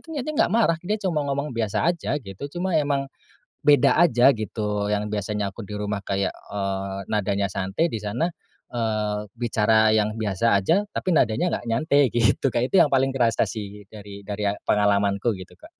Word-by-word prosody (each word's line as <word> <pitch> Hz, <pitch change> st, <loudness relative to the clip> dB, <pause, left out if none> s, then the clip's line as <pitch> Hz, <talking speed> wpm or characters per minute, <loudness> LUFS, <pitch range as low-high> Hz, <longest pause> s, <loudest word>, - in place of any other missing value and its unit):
niatnya 295 Hz, +1 st, -3 dB
enggak -, -, +2 dB
marah, 220 Hz, -8 st, +3 dB
dia 210 Hz, +3 st, 0 dB
cuma 165 Hz, -7 st, -1 dB
ngomong 140 Hz, +1 st, -2 dB
biasa 115 Hz, +8 st, 0 dB
aja 170 Hz, -6 st, -1 dB
gitu. 95 Hz, +2 st, -9 dB, 0.2 s
Cuma 185 Hz, -3 st, 0 dB
emang 140 Hz, -2 st, 0 dB, 0.6 s
beda 145 Hz, -1 st, +5 dB
aja 135 Hz, -6 st, +5 dB
gitu. 105 Hz, -1 st, -2 dB
Yang 105 Hz, 0 st, -1 dB
biasanya 105 Hz, -1 st, -2 dB
aku 115 Hz, -, -7 dB
di 105 Hz, -, -9 dB
rumah 105 Hz, -1 st, -3 dB
kayak, 100 Hz, 0 st, 0 dB
eee, 95 Hz, -1 st, -4 dB
nadanya 100 Hz, -2 st, 0 dB
santai, 95 Hz, -, -1 dB
di -, -, -3 dB
sana, 110 Hz, +11 st, -2 dB, 0.4 s
eee, 110 Hz, -3 st, -1 dB
bicara 110 Hz, -2 st, +2 dB
yang 110 Hz, 0 st, +1 dB
biasa 110 Hz, 0 st, 0 dB
aja 195 Hz, -, +2 dB
tapi 185 Hz, -, -2 dB
nadanya 115 Hz, +10 st, +2 dB
enggak 120 Hz, -, -12 dB
nyantai 140 Hz, +5 st, +2 dB
gitu, 115 Hz, +2 st, +2 dB
Kak. 120 Hz, +2 st, 0 dB
Itu 195 Hz, -, +3 dB
yang 140 Hz, -, -3 dB
paling 135 Hz, 0 st, +3 dB
terasa 115 Hz, -4 st, +2 dB
sih 105 Hz, -1 st, -8 dB
dari 100 Hz, -2 st, -10 dB
dari 105 Hz, +1 st, -4 dB, 0.2 s
pengalaman 100 Hz, -1 st, +2 dB
ku 115 Hz, +2 st, 0 dB
gitu, 95 Hz, -2 st, -11 dB
Kak. -, -, -16 dB
110 Hz, 180 wpm, -24 LUFS, 100-135 Hz, 0.6 s, beda